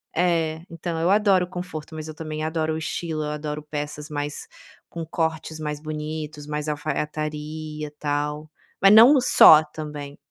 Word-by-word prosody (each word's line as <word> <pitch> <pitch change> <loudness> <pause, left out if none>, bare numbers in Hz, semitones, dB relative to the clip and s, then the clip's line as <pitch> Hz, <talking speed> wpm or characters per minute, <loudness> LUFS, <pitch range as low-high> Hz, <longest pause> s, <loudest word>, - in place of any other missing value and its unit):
É, 165 -2 +1
então, 165 0 -4
eu 170 - +2
adoro 200 -3 +3
conforto, 175 -3 -7
mas 155 0 -6
eu 155 - -7
também 155 -1 -5
adoro 160 0 -1
o - - -2
estilo, 160 -1 -3
eu 150 - -3
adoro 150 0 -5
peças 150 0 -6
mais 145 0 -4 0.4
com 170 - -6
cortes 160 -1 -3
mais 150 -1 -4
bonitos 155 -1 -5
mais 150 0 -3
alfaiataria, 150 0 -4
tal, 150 +1 -2 0.3
mas 195 +1 +7
não 235 +7 +9
o 265 - +4
só 155 -9 +8
também. 150 -2 -8
155 Hz, 155 wpm, -24 LUFS, 150-160 Hz, 0.4 s, não